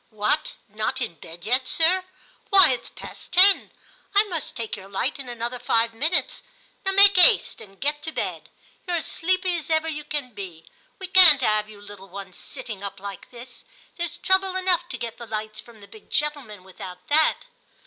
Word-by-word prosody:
' -, -, -40 dB
What, 295 Hz, -, 0 dB
not 215 Hz, +5 st, -3 dB
in 235 Hz, -8 st, -4 dB
bed 170 Hz, +4 st, -11 dB
yet, 255 Hz, +3 st, 0 dB
sir? 360 Hz, +3 st, +2 dB, 0.5 s
why, 385 Hz, -7 st, +7 dB
it's 250 Hz, -, -4 dB
past -, -, -12 dB
ten. 380 Hz, +2 st, +5 dB, 0.5 s
I 405 Hz, -, +6 dB
must 350 Hz, -7 st, -6 dB
take 230 Hz, -3 st, -4 dB
your 195 Hz, -1 st, -12 dB
light 245 Hz, +9 st, -3 dB
in 265 Hz, -2 st, -6 dB
another 240 Hz, +1 st, -5 dB
five 230 Hz, -1 st, 0 dB
minutes. 310 Hz, +10 st, +1 dB, 0.4 s
Now 385 Hz, -1 st, -1 dB
make 400 Hz, -1 st, +7 dB
'aste 430 Hz, +4 st, +5 dB
and 195 Hz, -2 st, -15 dB
get 295 Hz, +1 st, -1 dB
to 320 Hz, +1 st, -6 dB
bed; -, -, -5 dB, 0.4 s
you're 355 Hz, -, -1 dB
as 325 Hz, -, -5 dB
sleepy 365 Hz, +1 st, 0 dB
as 325 Hz, -, -8 dB
ever 315 Hz, 0 st, 0 dB
you 300 Hz, -2 st, -5 dB
can 290 Hz, -5 st, -4 dB
be; 175 Hz, -5 st, -10 dB, 0.3 s
we 380 Hz, -, -3 dB
can't 355 Hz, -7 st, +8 dB
'ave 215 Hz, -1 st, 0 dB
you 205 Hz, -, -14 dB
little 205 Hz, -1 st, -13 dB
ones 190 Hz, -1 st, -10 dB
sitting 240 Hz, -8 st, -8 dB
up 200 Hz, -1 st, -7 dB
like 200 Hz, -1 st, -9 dB
this; 245 Hz, +1 st, -13 dB, 0.3 s
there's 345 Hz, -1 st, -4 dB
trouble 380 Hz, +1 st, 0 dB
enough 360 Hz, -2 st, 0 dB
to -, -, -6 dB
get 230 Hz, -1 st, -7 dB
the 235 Hz, -, -10 dB
lights 215 Hz, 0 st, -6 dB
from 230 Hz, -3 st, -15 dB
the 200 Hz, -, -14 dB
big 215 Hz, +1 st, -17 dB
gentlemen 280 Hz, -10 st, -3 dB
without 185 Hz, -1 st, -12 dB
that.' 310 Hz, +1 st, +2 dB
255 Hz, 195 wpm, -23 LUFS, 210-345 Hz, 0.5 s, can't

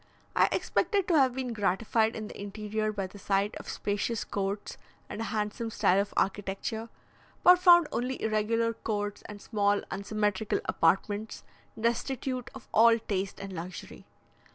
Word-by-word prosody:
I -, -, +5 dB
expected 400 Hz, -3 st, +1 dB
to 335 Hz, -, +4 dB
have 260 Hz, -2 st, +3 dB
been 255 Hz, -2 st, -3 dB
gratified 220 Hz, +2 st, +1 dB
in 215 Hz, -1 st, -5 dB
the -, -, -9 dB
interior 215 Hz, +1 st, -2 dB
by 200 Hz, -2 st, -3 dB
the 190 Hz, +2 st, -11 dB
sight 195 Hz, +1 st, 0 dB
of -, -, -9 dB
spacious 205 Hz, +2 st, -2 dB
courts 200 Hz, +1 st, -4 dB, 0.3 s
and 220 Hz, -, -6 dB
a -, -, -2 dB
handsome 215 Hz, +1 st, -2 dB
style 200 Hz, -3 st, +3 dB
of 200 Hz, -, -5 dB
architecture, 205 Hz, +3 st, -2 dB, 0.5 s
but 360 Hz, 0 st, +8 dB
found 345 Hz, -3 st, +7 dB
only 250 Hz, +2 st, -2 dB
irregular 225 Hz, +1 st, +1 dB
courts 205 Hz, -2 st, -3 dB
and 210 Hz, -1 st, -9 dB
small 205 Hz, -1 st, +1 dB
unsymmetrical 205 Hz, +1 st, -1 dB
apartments, 205 Hz, +5 st, 0 dB, 0.4 s
destitute 250 Hz, +2 st, -1 dB
of 265 Hz, -, -11 dB
all 230 Hz, +1 st, +6 dB
taste 195 Hz, -3 st, -3 dB
and 195 Hz, -1 st, -7 dB
luxury. 175 Hz, +1 st, -8 dB
215 Hz, 150 wpm, -29 LUFS, 200-230 Hz, 0.5 s, but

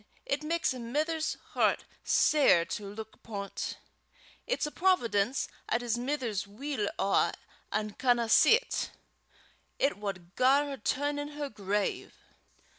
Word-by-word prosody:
it 280 Hz, +1 st, -1 dB
maks 325 Hz, -1 st, 0 dB
a 255 Hz, -, -7 dB
mither's 305 Hz, +7 st, -1 dB, 0.2 s
hert -, -, +2 dB, 0.2 s
sair 275 Hz, -, +4 dB
to 205 Hz, +3 st, -5 dB
luik 220 Hz, +1 st, -8 dB
upo' 200 Hz, -3 st, -6 dB
't. -, -, -4 dB, 0.7 s
It's -, -, 0 dB
a 300 Hz, -, -4 dB
providence 255 Hz, -, +2 dB, 0.2 s
'at 235 Hz, -, +1 dB
his 235 Hz, -2 st, 0 dB
mither's 240 Hz, -6 st, -2 dB
weel 220 Hz, 0 st, -3 dB
awa 195 Hz, -, +2 dB, 0.4 s
an' 215 Hz, 0 st, -1 dB
canna 240 Hz, -2 st, +3 dB
see 450 Hz, -, +7 dB
't; -, -, -2 dB, 0.9 s
it 275 Hz, -6 st, +1 dB
wad 185 Hz, -4 st, -6 dB
gar 270 Hz, +3 st, +4 dB
her 280 Hz, -1 st, -5 dB
turn 285 Hz, +6 st, -1 dB
in 290 Hz, -, -3 dB
her 295 Hz, -1 st, -5 dB
grave." 205 Hz, -1 st, -2 dB
245 Hz, 140 wpm, -30 LUFS, 210-290 Hz, 0.9 s, see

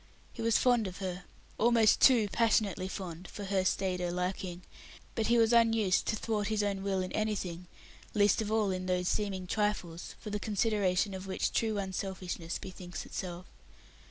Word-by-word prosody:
He -, -, -7 dB
was 230 Hz, -1 st, +3 dB
fond 245 Hz, -4 st, +3 dB
of 180 Hz, -, -7 dB
her 185 Hz, -2 st, -5 dB, 0.3 s
almost 230 Hz, -2 st, +5 dB
too 240 Hz, -6 st, +6 dB
passionately 210 Hz, -5 st, +2 dB
fond, 185 Hz, -2 st, -6 dB
for 205 Hz, -, -8 dB
her 195 Hz, -1 st, +1 dB
staider 180 Hz, -2 st, 0 dB
liking 180 Hz, 0 st, -3 dB, 0.5 s
but 225 Hz, -2 st, 0 dB
he 235 Hz, -, +4 dB
was 225 Hz, 0 st, +4 dB
unused 225 Hz, -5 st, +3 dB
to -, -, +1 dB
thwart 210 Hz, -1 st, -1 dB
his 215 Hz, -1 st, 0 dB
own 200 Hz, -1 st, -1 dB
will 195 Hz, -1 st, 0 dB
in 185 Hz, -, -5 dB
anything, 185 Hz, -5 st, -2 dB, 0.5 s
least 205 Hz, +1 st, +4 dB
of 215 Hz, -1 st, -3 dB
all 215 Hz, -3 st, +2 dB
in 185 Hz, 0 st, -3 dB
those 180 Hz, -1 st, 0 dB
seeming 195 Hz, -3 st, -1 dB
trifles, 185 Hz, -4 st, -2 dB
for 210 Hz, -, -7 dB
the 210 Hz, -, -2 dB
consideration 205 Hz, -2 st, +1 dB
of 190 Hz, 0 st, -6 dB
which 190 Hz, -, -1 dB
true 220 Hz, -2 st, +1 dB
selfishness 185 Hz, -3 st, -4 dB
bethinks 180 Hz, -3 st, -8 dB
itself. 180 Hz, -1 st, -6 dB
195 Hz, 170 wpm, -31 LUFS, 185-215 Hz, 0.5 s, too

